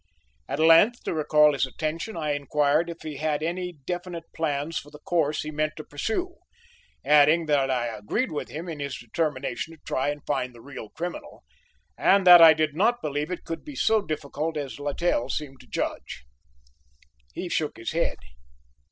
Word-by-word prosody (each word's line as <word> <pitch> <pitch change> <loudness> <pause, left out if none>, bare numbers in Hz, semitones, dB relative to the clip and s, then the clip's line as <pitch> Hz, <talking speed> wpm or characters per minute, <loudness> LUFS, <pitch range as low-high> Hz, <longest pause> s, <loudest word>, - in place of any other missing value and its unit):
At - - -3
length, 165 - +5
to - - -2
recall 150 -1 +4
his 135 -1 0
attention, 165 - -4
I 155 -2 -1
inquired 145 +3 +1
if 170 - -8
he 155 -3 -6
had 155 0 -1
any 180 +2 -3
definite 175 -1 -4
plans 155 0 -2
for 145 - -13
the 150 - -12
course 155 -1 0
he 155 - -5
meant 155 0 -1
to 155 - -6
pursue, 225 - -3 0.7
adding 150 +3 +5
that 145 -3 +2
I 125 -2 0
agreed 120 - -2
with 150 - -4
him 165 +4 -6
in 160 -3 -6
his 140 -2 -4
determination 140 +3 -3
to - - -25
try 135 +2 0
and 145 0 -5
find 130 -4 -2
the - - -13
real 130 -4 -9
criminal, 175 +7 -7 0.6
and 195 0 +4
that 175 -1 +10
I 160 -1 +10
did 155 -1 0
not 235 +7 +2
believe 150 +1 -2
it 180 - -5
could 165 - -5
be 295 -2 -9
so 220 -4 +3
difficult 155 -2 -4
as 145 -1 -5
Littell 145 -1 -1
seemed 135 -3 -4
to 125 - -17
judge. 105 - -4 1.1
He 180 - -4
shook 160 -3 -2
his 115 - -4
head. 165 +1 0
155 Hz, 180 wpm, -26 LUFS, 145-170 Hz, 1.1 s, that